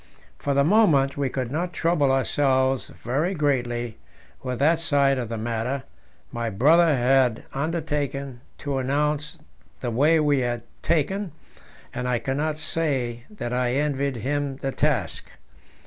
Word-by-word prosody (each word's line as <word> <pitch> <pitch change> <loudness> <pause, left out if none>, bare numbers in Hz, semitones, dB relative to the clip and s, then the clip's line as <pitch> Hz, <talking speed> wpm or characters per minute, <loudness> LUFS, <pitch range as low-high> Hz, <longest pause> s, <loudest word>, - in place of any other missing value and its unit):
For 140 -1 -1
the 140 - +4
moment 155 -7 +4
we 140 -2 -1
could 125 -1 -3
not 175 +4 -2
trouble 155 -4 +2
ourselves 135 0 +1
very 150 +10 -2
greatly 120 -6 -1 0.4
with 125 -1 -3
that 160 +5 +3
side 140 -5 +2
of 120 -3 -4
the 115 - -3
matter; 120 +4 -2 0.5
my 115 -1 -2
brother 155 - +4
had 125 -2 +3
undertaken 145 -4 -2 0.2
to 140 -3 -2
announce 150 +3 -1 0.4
the 120 - -3
way 150 +7 +4
we 145 -2 +3
had 120 -2 -2 0.2
taken, 175 +3 0 0.6
and 125 - -3
I 125 - +2
cannot 150 +5 -2
say 135 -7 -2
that 210 - -5
I 125 0 +1
envied 140 -1 0
him 140 +4 -2
the 135 0 -3
task. - - -1
140 Hz, 140 wpm, -24 LUFS, 125-150 Hz, 0.6 s, the